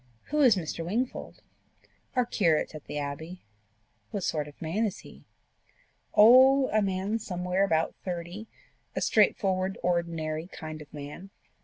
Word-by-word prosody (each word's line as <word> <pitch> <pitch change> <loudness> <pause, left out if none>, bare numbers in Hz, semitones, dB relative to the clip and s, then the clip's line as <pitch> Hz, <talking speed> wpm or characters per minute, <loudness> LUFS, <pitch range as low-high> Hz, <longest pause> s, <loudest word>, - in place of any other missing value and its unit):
"Who 300 0 +2
is 250 -6 +6
Mr. 165 -2 -4
Wingfold?" 230 +9 -3 0.7
"Our 250 -1 +3
curate 165 -11 +1
at 155 -2 -9
the - - -5
Abbey." 155 +5 -5 0.7
"What 200 - -4
sort 150 -3 -1
of 145 - -14
man 170 +7 -1
is 210 -4 -2
he?" - - -15 0.9
"Oh, 260 +5 +7
a 215 - +2
man 195 +3 -1
somewhere 180 -1 -1
about 165 -4 +1
thirty 180 +4 -5 0.5
a - - -1
straightforward, 190 -3 +2
ordinary 165 -2 -1
kind 155 -4 -8
of 150 - -13
man." 150 +6 -8
180 Hz, 140 wpm, -28 LUFS, 160-210 Hz, 0.9 s, Oh